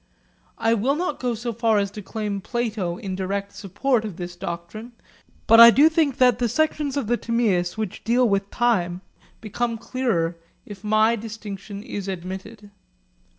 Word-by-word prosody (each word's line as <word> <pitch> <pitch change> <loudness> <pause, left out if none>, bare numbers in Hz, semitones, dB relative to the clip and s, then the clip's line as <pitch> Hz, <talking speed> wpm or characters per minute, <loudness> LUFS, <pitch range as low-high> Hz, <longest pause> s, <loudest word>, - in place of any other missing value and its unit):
I 225 - +2
will 240 +6 +1
not 335 -1 -2
go 245 -2 -1
so 235 +1 -4
far 225 -1 +2
as 200 -1 0
to 210 - -8
claim 205 -1 -4
Plato 215 -6 -2
in 190 -1 -5
direct 200 +1 -3
support 220 +5 -1
of 205 -6 -6
this 175 -1 -6
doctrine, 175 +8 -7 0.5
but 225 - +7
I 235 0 +12
do 285 +7 +6
think 315 -5 +1
that 250 -3 +4
the 240 -2 +1
sections 295 +1 0
of 280 - -1
the 240 +3 +1
Timaeus 215 -7 0
which 215 -4 -4
deal 245 +2 +3
with 200 -1 0
time 185 -7 0 0.4
become 230 +2 -2
clearer 225 -8 -1 0.3
if 205 -1 -11
my 215 +2 +3
distinction 210 -2 -8
is 200 -2 -6
admitted. 190 +3 -7
220 Hz, 165 wpm, -23 LUFS, 195-240 Hz, 0.5 s, I